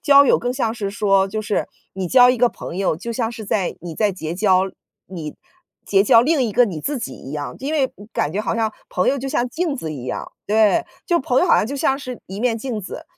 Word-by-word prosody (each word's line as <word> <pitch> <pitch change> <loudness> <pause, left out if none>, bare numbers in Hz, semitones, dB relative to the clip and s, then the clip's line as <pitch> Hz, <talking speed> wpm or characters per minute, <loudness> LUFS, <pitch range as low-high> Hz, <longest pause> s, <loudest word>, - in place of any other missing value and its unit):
交 280 -1 +7
友 - - +4
更 245 +1 -2
像 235 -4 -1
是 200 -4 -3
说， 195 -2 +2
就 215 +3 -3
是 210 -1 -1 0.2
你 190 -2 -4
交 245 +5 +7
一 250 - 0
个 245 +1 +4
朋 180 - -7
友， 190 -5 +1
就 235 +8 -5
像 225 -1 -1
是 230 -2 -8
在 195 -2 -1
你 170 -2 -7
在 210 +2 +2
结 170 -3 -5
交 190 -1 +3 0.4
你 160 -5 -7 0.5
结 195 -1 +3
交 230 +3 +6
另 290 +3 +2
一 235 - 0
个 245 +4 +4
你 180 -9 -5
自 285 - -2
己 - - -5
一 135 - -10
样， 145 -1 -4
因 285 +4 -3
为 290 -4 +2
嗯 205 - -13
感 145 - -1
觉 205 - -1
好 - - -1
像 220 -2 0 0.2
朋 180 - 0
友 275 - +2
就 270 +1 -4
像 255 -3 0
镜 320 +1 -2
子 160 - -5
一 130 -4 -7
样。 - - -5
对， 220 +10 +3 0.2
就 345 -1 +2
朋 260 -1 +1
友 - - +3
好 - - +5
像 - - +2
就 280 +4 -4
像 270 0 +1
是 255 -3 -7
一 195 +2 -7
面 240 -1 +1
镜 230 -1 -4
子， 190 - -8
220 Hz, 280 characters per minute, -21 LUFS, 190-255 Hz, 0.5 s, 交